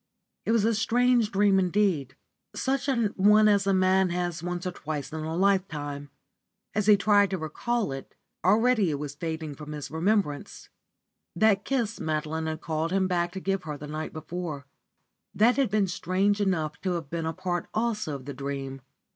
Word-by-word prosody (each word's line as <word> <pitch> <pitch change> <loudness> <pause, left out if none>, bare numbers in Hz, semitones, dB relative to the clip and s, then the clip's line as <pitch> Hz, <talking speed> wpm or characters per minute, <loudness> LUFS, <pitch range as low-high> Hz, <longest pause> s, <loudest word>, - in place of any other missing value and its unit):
It - - +1
was 225 -2 +3
a 230 - +3
strange 240 +1 +2
dream 195 -1 +4
indeed, 185 -7 +1 0.4
such 270 +1 -1
an 235 -6 +1
one 210 +2 +6
as 200 -1 +3
a - - +4
man 190 0 +3
has 175 -1 -2
once 175 +1 -4
or 180 - -1
twice 155 -4 -5
in 160 - -3
a 160 +1 -3
lifetime. 155 -7 0 0.6
As 210 -1 0
he 210 -1 +7
tried 205 0 +4
to 190 - -2
recall 195 +6 -2
it, 135 0 -8 0.3
already 215 +1 +4
it 145 - -1
was 145 -1 -5
fading 160 0 -4
from 150 +1 -8
his 145 -2 -6
remembrance. 165 -3 -1 0.7
That 200 +1 +3
kiss 235 -5 -1
Madeline 155 +1 -2
had 155 0 -4
called 160 +1 -2
him 190 0 +2
back 175 -1 0
to 190 - -4
give 195 0 -1
him 150 -2 -4
the 150 - -8
night 155 +1 -5
before; 155 -3 -5 0.7
that 235 +5 +4
had 275 -5 +2
been 205 -1 +2
strange 195 +3 0
enough 160 -6 -1
to 185 -2 -1
have 165 -5 -5
been 165 -1 -2
a 160 - -2
part 175 +1 -3
also 215 -8 -1
of 130 -2 -9
the 140 - -5
dream. 135 0 -5
180 Hz, 185 wpm, -27 LUFS, 155-205 Hz, 0.7 s, he